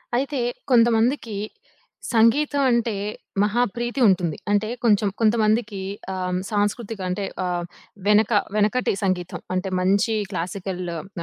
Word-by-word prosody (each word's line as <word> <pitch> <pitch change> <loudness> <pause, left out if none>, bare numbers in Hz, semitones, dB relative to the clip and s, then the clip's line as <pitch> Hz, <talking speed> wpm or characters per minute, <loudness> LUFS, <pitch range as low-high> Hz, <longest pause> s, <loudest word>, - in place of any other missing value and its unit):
అయితే, 275 +2 -1 0.3
కొంతమందికి 230 -1 +3 0.8
సంగీతం 280 +6 +3
అంటే, 235 -1 +1 0.5
మహా 215 +4 +1
ప్రీతి 240 +2 -3
ఉంటుంది. 175 -5 +1
అంటే, 205 +1 +2 0.2
కొంచెం 210 -3 +3
కొంతమందికి 215 -1 +2 0.3
ఆహ్, 180 -1 -2
సాంస్కృతిక 205 +1 -1
అంటే 195 +2 -2 0.2
ఆహ్, 175 -1 -2 0.4
వెనక 210 +2 +4 0.2
వెనకటి 215 +4 +2
సంగీతం. 185 -2 -1 0.2
అంటే 185 +1 -1
మంచి 200 +5 +2 0.2
క్లాసికల్లు 180 -1 -4
ఆహ్, 160 +5 -8
210 Hz, 110 wpm, -23 LUFS, 185-235 Hz, 0.8 s, వెనక